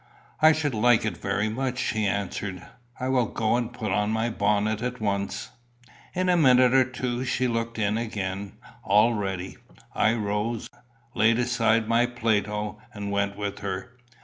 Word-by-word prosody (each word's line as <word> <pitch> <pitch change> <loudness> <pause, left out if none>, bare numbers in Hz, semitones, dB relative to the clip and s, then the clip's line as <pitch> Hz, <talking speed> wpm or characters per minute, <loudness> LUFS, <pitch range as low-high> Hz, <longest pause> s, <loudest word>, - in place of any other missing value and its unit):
"I 155 0 +8
should 150 -3 0
like 115 0 +3
it 105 -5 -1
very 100 +2 -1
much," 125 +3 -2
she 110 -4 0
answered. 95 -1 -3 0.3
"I 130 - -2
will 130 -3 +2
go 110 +2 0
and 120 -1 -1
put 110 -4 -4
on 105 +2 +1
my 110 +2 0
bonnet 105 +1 +1
at 125 0 -3
once." 100 -2 -2 0.6
In 185 0 0
a 180 - +4
minute 130 -5 +5
or 130 -1 +5
two 125 -1 -3
she 130 0 0
looked 115 -1 -2
in 105 0 0
again, 100 -3 -4 0.3
all 105 +4 +4
ready. 95 -3 -4 0.4
I 110 +2 +2
rose, 105 +1 -2 0.5
laid 110 +1 +3
aside 115 -2 +2
my 115 +2 +3
Plato, 105 -3 -1
and 100 -1 -4
went 100 0 -1
with 100 -1 -4
her. 95 +4 -5
110 Hz, 165 wpm, -26 LUFS, 100-120 Hz, 0.6 s, I